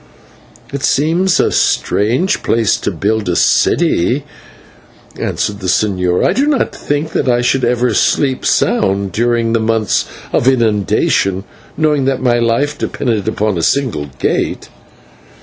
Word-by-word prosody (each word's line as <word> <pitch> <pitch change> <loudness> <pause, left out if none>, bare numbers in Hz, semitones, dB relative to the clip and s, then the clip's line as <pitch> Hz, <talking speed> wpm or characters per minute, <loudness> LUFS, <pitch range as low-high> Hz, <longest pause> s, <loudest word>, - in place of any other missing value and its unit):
"It 140 - -3
seems 170 +6 +1
a - - +2
strange 125 - +1
place 115 -2 +1
to - - -3
build 105 -1 -1
a 90 - 0
city," 125 +13 +2 0.9
answered 100 -1 -2
the 95 - -5
señor. 90 -2 +1
"I - - +1
do 280 +3 +1
not 295 -3 0
think 145 +2 -3
that 130 - -1
I 120 0 +2
should 125 +2 0
ever 120 0 +1
sleep 130 +4 +1
sound 100 0 +1
during 115 +1 0
the 115 - +2
months 110 -2 0 0.3
of 125 - +1
inundation, 105 -5 +1 0.3
knowing 150 -3 +1
that 135 -1 0
my 120 -2 +1
life 120 +6 0
depended 110 -6 -2
upon 105 -4 -1
a - - -1
single 110 - 0
gate." - - -2
115 Hz, 140 wpm, -15 LUFS, 105-135 Hz, 0.9 s, a